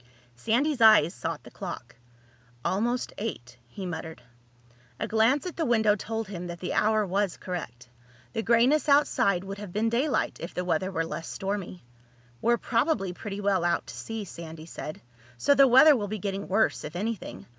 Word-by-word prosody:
Sandy's 245 - 0
eyes 215 -7 +7
sought 120 - -5
the - - -13
clock. - - -7 0.7
"Almost 235 +6 0
eight," 125 - -5
he 190 +11 -7
muttered. 160 -4 -6 0.8
A - - -2
glance 225 +8 +2
at 360 - -5
the 330 - 0
window 220 -3 +3
told 225 +1 -4
him 180 -3 -6
that 175 0 -7
the 180 - -3
hour 215 0 +2
was 195 0 -1
correct. 125 -10 -6 0.5
The 225 - -1
grayness 245 +7 +3
outside 200 -10 +3
would 195 +1 -7
have 205 -3 -7
been 215 +4 0
daylight 260 +5 0
if 170 - -7
the 180 - -2
weather 180 +2 0
were 165 -3 -1
less 165 +1 -6
stormy. 195 -2 -4 0.6
"We're 235 +1 +3
probably 230 - 0
pretty 205 +2 -6
well 195 -3 +1
out 175 - +1
to - - -9
sea," 225 -2 -5
Sandy 165 -3 -9
said. 155 -2 -7 0.4
"So 285 - +4
the 275 -1 +6
weather 265 +5 +8
will 210 -5 -2
be 215 +2 -4
getting 200 0 -4
worse, 220 +4 +1
if 155 +3 -7
anything. 215 +3 -4
205 Hz, 175 wpm, -27 LUFS, 175-230 Hz, 0.8 s, weather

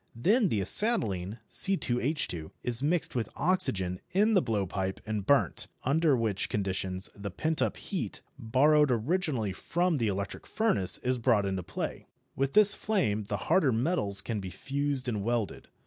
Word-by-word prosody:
Then 200 - +2
the 105 -7 0
acetylene 105 - +2
(C_H_) 125 - 0
is 120 0 0
mixed 160 +4 +1
with 115 -4 -2
oxygen 95 - 0
in 210 +4 +2
the 190 - +5
blowpipe 95 - -2
and 105 -2 -3
burnt, 140 -1 +2 0.2
under 145 +1 +2
which 110 -5 -1
conditions 95 -2 -2
the 100 0 -6
pent 155 - -2
up - - 0
heat, 190 - -4 0.2
borrowed 145 +5 +3
originally 125 - 0
from 175 - 0
the 115 -4 0
electric 100 0 -4
furnace, 100 - 0
is 125 0 0
brought 115 -4 +2
into 95 -1 -2
play. 85 - -5 0.3
With 135 0 -1
this 210 -1 +7
flame 140 - -1
the 100 0 -3
harder 150 -8 +3
metals 115 - +1
can 110 0 -3
be 95 -1 -6
fused 140 +3 -2
and 105 -5 -2
welded. 115 -1 -2
120 Hz, 155 wpm, -29 LUFS, 100-160 Hz, 0.3 s, this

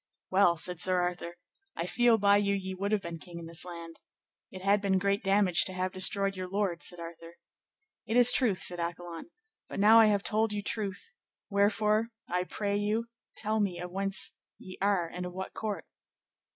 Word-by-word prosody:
Well, 185 -3 +4
said 180 +2 -1
Sir 185 0 +1
Arthur, 175 -1 -3 0.4
I 165 - -3
feel 240 +4 +3
by 200 -1 +4
you 200 -1 +1
ye 190 -1 -4
would 200 +2 -3
have 210 -2 0
been 170 -1 -6
king 175 +1 -11
in 170 - -8
this 165 0 -5
land. 170 -2 -10 0.5
It 185 0 -10
had 200 +1 +3
been 195 -2 +1
great 200 +2 0
damage 195 -2 +4
to 185 - +1
have 185 0 -2
destroyed 195 +1 +4
your 185 0 -5
lord, 195 -3 -2
said 175 - -3
Arthur. 165 0 -10 0.7
It 225 - 0
is 245 0 +8
truth, 225 -7 +2
said 175 -1 0
Accolon, 170 - -6 0.4
but - - -6
now 220 +3 +7
I 225 - +7
have 205 -2 +1
told 215 0 0
you 205 -1 -3
truth, 200 -2 -4 0.4
wherefore 210 +2 +2 0.2
I 180 +1 -1
pray 200 +1 -2
you 215 +3 -1 0.3
tell 220 0 -1
me 195 -4 -1
of 180 0 -7
whence 195 +1 0 0.3
ye 185 - -11
are, 195 -4 +1
and 180 +2 -7
of 180 0 -6
what 190 +1 -6
court? 215 -2 -5
195 Hz, 195 wpm, -29 LUFS, 180-205 Hz, 0.7 s, is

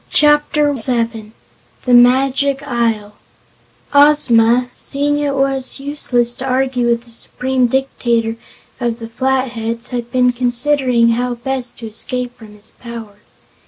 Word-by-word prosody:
Chapter 295 -1 +2
Seven 230 -3 -1 0.5
The 250 - +2
Magic 270 +3 +3
Isle 225 -4 -1 0.8
Ozma, 250 -4 +4
seeing 290 +1 0
it 285 -1 -1
was 270 -1 0
useless 255 -4 0
to 260 - -4
argue 255 -1 0
with 235 0 0
the 240 - -14
Supreme 255 +2 -1
Dictator 235 -3 -1 0.4
of 235 -2 -2
the 230 -1 -8
Flatheads, 235 -2 -2
had 240 -1 -5
been 250 -1 +3
considering 250 -1 +2
how 245 +1 -1
best 250 +1 -4
to 230 - -8
escape 245 +3 -4
from 215 -3 -14
his 210 +1 -15
power. 230 -4 -9
245 Hz, 125 wpm, -16 LUFS, 235-270 Hz, 0.8 s, Ozma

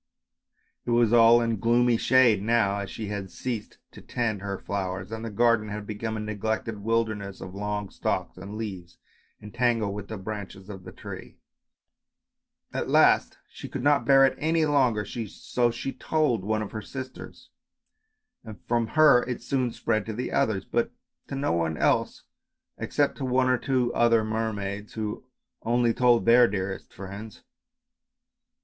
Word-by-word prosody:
It - - -6
was 120 -1 +3
all 120 0 +7
in 115 -3 -1
gloomy 120 +2 +3
shade 120 -4 +4
now, 105 -2 +2
as 100 -1 -5
she 110 -2 -6
had 100 -2 -4
ceased 115 -1 -5
to - - -13
tend 110 -5 -2
her 100 -1 -4
flowers 95 0 -4
and 110 0 -5
the 115 - -4
garden 115 0 +2
had 105 0 -5
become 110 +1 -4
a - - -4
neglected 105 +1 -3
wilder 115 +1 +1
ness 100 -2 -8
of 95 - -8
long 105 0 -3
stalks - - -2
and 100 +3 -8
leaves 95 -6 -7 0.5
entangled 115 -1 0
with 105 0 -6
the 110 - -6
branches 100 -1 -7
of 95 -2 -10
the - - -8
tree. - - -10 1.4
At - - -2
last - - +4
she - - -10
could 130 - -5
not 145 0 +4
bear 135 -1 +7
it 135 - +2
any 160 +1 +2
longer, 130 -8 +2
so 120 +2 -2
she 135 +3 -4
told 150 -10 0
one 110 +1 0
of 100 - -7
her 110 - -5
sisters, 130 +3 -9 0.9
and 110 -3 -10
from 120 -1 +1
her 150 -5 +7
it 125 -1 -5
soon 130 -3 0
spread 110 -1 -1
to 110 - -3
the 125 +4 -4
others, 95 -3 0
but 235 0 0 0.4
to 140 - -5
no 140 +1 0
one 80 -2 0
else - - +1 0.6
except - - 0
to - - -3
one 130 0 +2
or 125 - +3
two 125 -3 0
other 115 -1 +4
mermaids 105 -2 -3
who 110 +2 -4 0.4
only 120 0 +2
told 120 -1 +3
their 120 +1 +7
dearest 95 -1 -4
friends. 100 +3 -9
110 Hz, 165 wpm, -26 LUFS, 100-120 Hz, 1.4 s, all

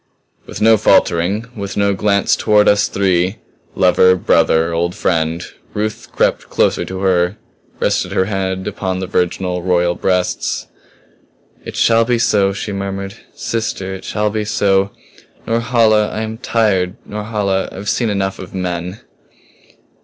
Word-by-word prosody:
With - - -8
no 110 +1 +6
faltering, 95 +3 +2
with 100 -2 -5
no 100 0 +2
glance 100 0 +2
toward 105 -1 +3
us 105 0 +4
three 95 0 +1 0.4
lover, 95 0 +5
brother, 85 -2 +2
old 85 +1 -1
friend 80 0 -1 0.3
Ruth 105 0 -3
crept - - 0
closer - - +1
to 95 0 -6
her, 90 0 +1 0.4
rested - - 0
her 95 - +1
head 95 -2 -2
upon 95 -2 -3
the 95 - -3
virginal, 90 -1 -1
royal 90 -1 +1
breasts. 90 0 -1 1.0
"It - - -8
shall 115 0 +4
be 120 +1 +1
so!" 100 -4 +2
she 100 +2 -5
murmured. 100 0 -4 0.2
"Sister 95 -4 -3
it 95 - -8
shall 105 0 -1
be 110 0 -2
so. 100 -2 +1 0.6
Norhala 115 -2 +2
I 110 - -4
am 110 0 -5
tired. 100 -7 +1
Norhala 105 -2 -2
I - - -11
have 100 +2 -7
seen 115 +1 +1
enough 95 -1 -2
of 95 0 -9
men." 90 +1 -4
95 Hz, 145 wpm, -17 LUFS, 90-105 Hz, 1.0 s, no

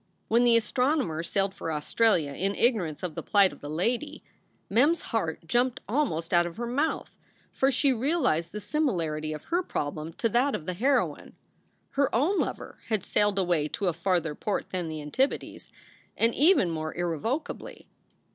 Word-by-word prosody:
When 235 +2 +4
the 235 -1 +6
astronomer 250 - 0
sailed 195 +3 0
for 165 - -5
Australia 155 +1 +1
in 195 +7 -1
ignorance 195 - +1
of 180 -3 -3
the - - -5
plight 200 -2 +3
of - - -15
the 145 - -7
lady, 240 - -2 0.4
Mem 245 +9 +4
s 335 -1 0
heart 165 -8 -3
jumped 245 +7 +1
almost 195 - -1
out 175 0 +4
of 170 - -9
her 240 - -3
mouth, 280 +7 -1 0.4
for 270 - +2
she 275 +1 +3
realized 245 - 0
the 210 - -5
similarity 170 - -1
of 155 -1 -6
her 345 +2 0
problem 155 - -4
to 230 - 0
that 250 +5 +2
of 155 - -6
the 185 - -2
heroine. 265 +9 0 0.6
Her 280 0 +2
own 315 - +2
lover - - -4
had 215 -5 0
sailed 205 -1 +1
away 175 -5 +1
to 190 +4 -1
a - - -1
farther 170 -2 0
port 205 +7 -3
than 180 -3 -2
the 155 -1 -5
Antipodes, 260 - -2 0.5
and 230 +1 +3
even 295 - +4
more 155 -1 -4
irrevocably. 220 - -3
200 Hz, 175 wpm, -27 LUFS, 165-255 Hz, 0.6 s, the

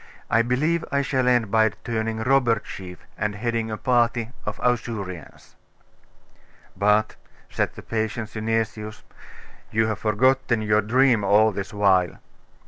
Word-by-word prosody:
I 115 - +4
believe 150 +8 0
I 140 0 +1
shall 130 -2 0
end 120 -5 +2
by 110 0 +4
turning 110 +2 -4
robber 125 -2 +3
chief, 90 -3 -10
and 105 -1 -1
heading 115 0 -2
a 110 - -4
party 120 -2 +1 0.2
of 105 0 -4
Ausurians.' 105 - -3 1.2
'But,' 105 +1 +2 0.4
said - - -1
the - - -10
patient 110 0 -3
Synesius 110 -1 -3 0.7
'you 110 +1 +2
have 110 -1 -2
forgotten 120 +1 +1
your 105 0 +3
dream 120 0 +3
all 105 +2 +4
this 95 -1 -5
while. 95 -4 +2
110 Hz, 135 wpm, -24 LUFS, 105-120 Hz, 1.2 s, I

